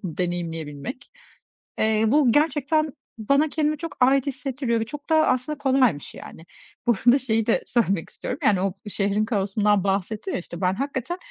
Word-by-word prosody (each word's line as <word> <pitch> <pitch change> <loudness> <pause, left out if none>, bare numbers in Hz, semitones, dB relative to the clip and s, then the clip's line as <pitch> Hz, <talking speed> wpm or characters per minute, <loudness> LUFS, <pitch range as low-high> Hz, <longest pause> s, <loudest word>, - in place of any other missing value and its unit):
deneyimleyebilmek. 170 - -4 0.7
Eee, 220 0 +2
bu 265 0 +4
gerçekten 305 +1 +1 0.3
bana 280 +8 +2
kendimi 305 0 0
çok 330 +2 -6
ait 265 +2 +4
hissettiriyor 265 -3 -2
ve - - 0
çok 290 +6 -9
da 315 -1 +4
aslında 255 +4 0
kolaymış, 260 - +1
yani. 160 - -11 0.4
Bu - - +6
arada 245 +2 +7
şeyi 225 -5 0
de 230 - +2
söylemek 200 -8 0
istiyorum, 250 - -6
yani, 195 -3 +3
o 195 -1 0 0.2
şehrin 205 +1 0
kaosundan 205 -1 +1
bahsettim, 200 - -2
ya, - - -1
işte, 170 0 -9
ben 185 0 +2
hakikaten, 275 - -3
235 Hz, 160 wpm, -24 LUFS, 195-280 Hz, 0.7 s, arada